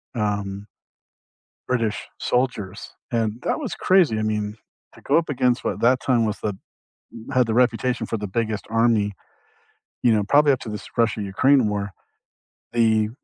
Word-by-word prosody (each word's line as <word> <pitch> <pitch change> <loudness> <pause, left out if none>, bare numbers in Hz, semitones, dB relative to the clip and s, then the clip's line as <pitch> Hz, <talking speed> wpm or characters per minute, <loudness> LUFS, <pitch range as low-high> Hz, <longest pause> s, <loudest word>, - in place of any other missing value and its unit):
um 100 -2 -2 1.0
British 115 -4 -1
soldiers, 115 -6 -2 0.2
and 115 -3 0
that - - 0
was 265 -7 -4
crazy. 175 - +3
I 110 - -1
mean, 105 -1 -2 0.4
to - - -16
go - - +3
up 170 - -6
against 125 -3 +1
what - - -2
that 125 +2 +4
time 120 -4 +2
was 105 0 -2
the 105 -3 -3 0.7
had 130 -3 +3
the 110 - -1
reputation 125 +1 +1
for 115 - -2
the 105 - -4
biggest 110 0 -2
army. 115 -3 +2 0.9
You 120 -2 +5
know, 105 - +2
probably 145 +7 +4
up 130 - -1
to - - -8
this 105 -1 -6
Russia-Ukraine 115 +3 +2
war, 100 -1 -2 0.8
the 120 - +2
you 110 -1 +2
115 Hz, 160 wpm, -23 LUFS, 105-125 Hz, 1.0 s, You